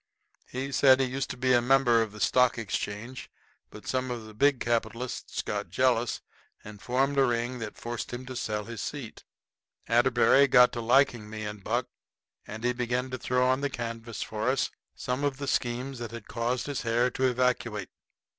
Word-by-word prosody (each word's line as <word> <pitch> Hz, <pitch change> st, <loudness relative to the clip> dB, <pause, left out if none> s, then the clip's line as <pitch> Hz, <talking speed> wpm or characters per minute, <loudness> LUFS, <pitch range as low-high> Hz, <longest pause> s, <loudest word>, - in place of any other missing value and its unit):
He 135 Hz, +2 st, -4 dB
said 130 Hz, -1 st, +6 dB
he 135 Hz, -, +3 dB
used 130 Hz, +2 st, -3 dB
to -, -, -5 dB
be 130 Hz, 0 st, +2 dB
a 120 Hz, -, +5 dB
member 125 Hz, -2 st, +4 dB
of 110 Hz, -2 st, -2 dB
the 105 Hz, -, -11 dB
Stock 125 Hz, +3 st, +3 dB
Exchange, 115 Hz, +3 st, -4 dB, 0.4 s
but 105 Hz, -, -12 dB
some 130 Hz, 0 st, -1 dB
of 120 Hz, -3 st, -5 dB
the 110 Hz, -, -11 dB
big 135 Hz, +4 st, +3 dB
capitalists 120 Hz, +1 st, -2 dB
got -, -, -3 dB
jealous -, -, +1 dB, 0.4 s
and 105 Hz, -1 st, -11 dB
formed 135 Hz, +3 st, +1 dB
a -, -, +6 dB
ring 120 Hz, +1 st, -1 dB
that 110 Hz, -2 st, -6 dB
forced 120 Hz, 0 st, -5 dB
him 120 Hz, +1 st, -6 dB
to 130 Hz, 0 st, -7 dB
sell 105 Hz, -3 st, -2 dB
his 115 Hz, -2 st, -6 dB
seat. 140 Hz, -7 st, -6 dB, 0.6 s
Atterbury 140 Hz, +1 st, +5 dB
got 125 Hz, -1 st, +6 dB
to 120 Hz, -, -4 dB
liking 120 Hz, -2 st, +3 dB
me 110 Hz, 0 st, -6 dB
and 105 Hz, -1 st, -7 dB
Buck 120 Hz, +4 st, 0 dB, 0.6 s
and 110 Hz, +2 st, -7 dB
he 125 Hz, 0 st, +2 dB
begun 125 Hz, +1 st, -2 dB
to 130 Hz, -, -4 dB
throw 125 Hz, +1 st, +1 dB
on 130 Hz, +1 st, +2 dB
the 145 Hz, -, 0 dB
canvas 115 Hz, -2 st, -5 dB
for 110 Hz, +3 st, -2 dB
us 135 Hz, 0 st, 0 dB, 0.2 s
some 125 Hz, +3 st, -3 dB
of 140 Hz, -2 st, 0 dB
the 140 Hz, 0 st, -5 dB
schemes 125 Hz, +1 st, -1 dB
that 120 Hz, -1 st, -5 dB
had 115 Hz, -1 st, -9 dB
caused 120 Hz, +2 st, -1 dB
his 145 Hz, -2 st, -3 dB
hair 120 Hz, +2 st, +1 dB
to 130 Hz, -, 0 dB
evacuate. 120 Hz, -5 st, 0 dB
125 Hz, 195 wpm, -28 LUFS, 115-130 Hz, 0.6 s, said